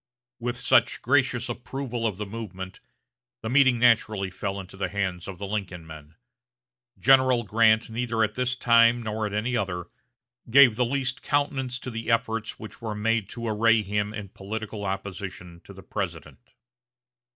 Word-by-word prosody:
With 120 +1 -3
such 120 -1 +3
gracious 130 -2 +2
approval 120 -1 -3
of 100 -4 -4
the 105 - -4
movement 100 -3 -7 0.6
the 110 - -3
meeting 130 -2 +5
naturally 110 -5 +3
fell 100 +1 -4
into 95 0 -10
the 95 - -2
hands 95 -4 -3
of 95 -2 -7
the 100 - -5
Lincoln 95 -4 -4
men. 80 0 -12 0.8
General 130 -2 +4
Grant 110 +1 +3
neither 115 0 -1
at 105 -1 0
this 125 0 -1
time 115 -1 +4
nor 110 0 -2
at 105 - -7
any 120 +4 -1
other, 90 -5 -2 0.6
gave 130 -2 +7
the 125 +2 +2
least 130 +1 -2
countenance 135 -3 -1
to 125 - -7
the 115 0 -5
efforts 115 -1 0
which 110 - -10
were 110 -2 -4
made 115 0 0
to 115 0 -5
array 110 0 +3
him 105 +1 -1
in 105 -3 -7
political 105 +1 -6
opposition 95 -3 -6
to - - -12
the - - -12
President. - - -6
110 Hz, 160 wpm, -26 LUFS, 100-120 Hz, 0.8 s, gave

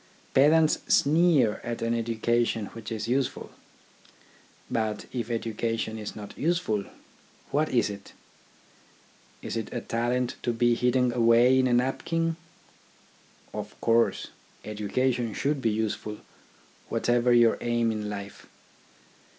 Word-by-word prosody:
Pedants 155 +3 +4
sneer 150 -7 +3
at 120 -1 -4
an 115 0 0
education 115 -1 0
which 115 -1 -8
is 110 -1 -3
useful. 130 +1 -1 1.2
But 110 -2 -2
if 120 -2 -3
education 115 -1 -2
is 105 - -6
not 105 -2 -9
useful, 150 - 0 0.7
what 155 +2 +1
is 120 -4 +2
it? 100 -1 -10 1.3
Is - - -4
it 115 -2 -4
a 120 - -2
talent, 120 +2 -1
to 120 - -1
be 120 +1 +3
hidden 125 +1 +2
away 120 +2 +5
in 130 - +3
a 125 - +1
napkin? 165 +6 0 1.2
Of - - -7
course, 115 0 +2 0.4
education 115 +3 -1
should 145 0 -1
be 115 - +2
useful, 105 -1 -2 0.7
whatever 120 0 +2
your 120 -1 +5
aim 120 -1 +1
in 105 -1 -4
life. 100 -1 -8
120 Hz, 120 wpm, -27 LUFS, 110-125 Hz, 1.3 s, away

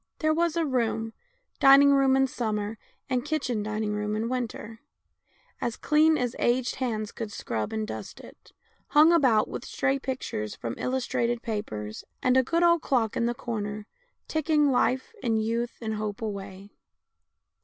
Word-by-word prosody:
There 310 0 +2
was 335 0 +1
a 335 -1 +1
room, 230 -4 -1 0.5
dining 275 0 +7
room 270 -1 +4
in 270 - +4
summer, 215 -4 -3 0.3
and 255 -2 0
kitchen 275 -7 -1
dining 215 0 -2
room 210 0 -2
in 225 +2 -2
winter, 230 -3 -4 0.8
as 235 - -2
clean 310 +1 +4
as 245 -1 -2
aged 245 +1 +1
hands 220 -5 -2
could 220 -2 -6
scrub 110 - -3
and 220 -1 -2
dust - - -7
it, - - -15 0.4
hung 305 +3 +6
about 255 -10 +4
with - - -6
stray 275 0 0
pictures 245 - -4
from 115 - -5
illustrated 240 -2 -1
papers, 110 - -4 0.2
and 255 0 +3
a 260 - +6
good 335 +7 0
old 340 -1 +4
clock 235 -5 0
in 235 - +1
the 240 - -1
corner 210 -3 -4 0.4
ticking 305 -2 +2
life, 255 - +1
and 220 -2 +1
youth, 235 +1 -2
and 220 -1 -2
hope 210 -1 -4
away. 200 -1 -6
240 Hz, 160 wpm, -27 LUFS, 215-270 Hz, 0.8 s, dining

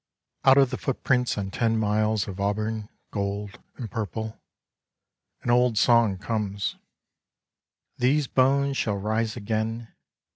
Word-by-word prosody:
*' - - -27
Out 135 0 +7
of 135 -2 +5
the 130 - -3
footprints 125 -3 0
on 95 -1 -3
ten 115 0 +1
miles 110 0 +1
of 95 -1 -7
auburn, 105 +2 -1 0.2
gold 100 0 -3 0.2
and 115 -5 -7
purple 110 0 -4 0.5
— - - -43
an 120 - +1
old 120 -2 +3
song 115 -3 +4
comes: 100 -1 -2 1.2
These 140 +4 +3
bones 135 +2 +2
shall 105 -3 0
rise 110 +3 -1
again. 110 +1 -3
110 Hz, 135 wpm, -26 LUFS, 105-125 Hz, 1.2 s, Out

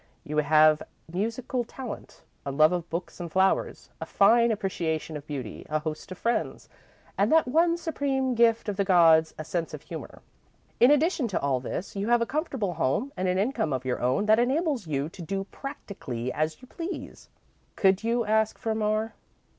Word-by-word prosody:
You 150 +1 -4
have 155 +1 +5 0.3
musical 230 +6 -2
talent, 245 -1 -9 0.2
a 140 - -3
love 155 +3 +5
of 175 -2 -3
books 170 +2 -5
and 170 -2 -6
flowers, 190 +2 +1
a - - -4
fine 235 +4 +4
appreciation 170 -7 -2
of 150 0 -8
beauty, 130 -7 -6
a 155 - +1
host 155 +4 -5
of 185 - -6
friends, 235 +1 -2 0.5
and - - +3
that 320 -3 +4
one 335 +5 +3
supreme 275 -6 -1
gift 230 -1 +3
of 205 -2 -2
the 200 - +2
gods 165 -4 +5
a 155 - -6
sense 170 -2 -3
of - - -12
humour. - - -9 0.6
In 245 - +7
addition 295 -2 +3
to 200 - -1
all 135 -2 0
this, 150 +11 -5
you 200 +1 -2
have 240 0 +4
a 235 - +1
comfortable 265 - -2
home 170 - -1
and 185 0 -1
an 180 0 +1
income 200 - 0
of 130 0 -3
your 125 - -1
own 130 +11 +1
that 215 +1 +5
enables 270 - 0
you 140 -1 -1
to 175 - -11
do 195 +4 -3
practically 135 - -6
as 155 +9 -2
you - - -12
please. 335 +7 -7 0.5
Could 195 0 +3
you 230 0 +1
ask 220 0 +1
for 225 - -2
more?" 215 +1 -1
200 Hz, 185 wpm, -27 LUFS, 160-240 Hz, 0.6 s, In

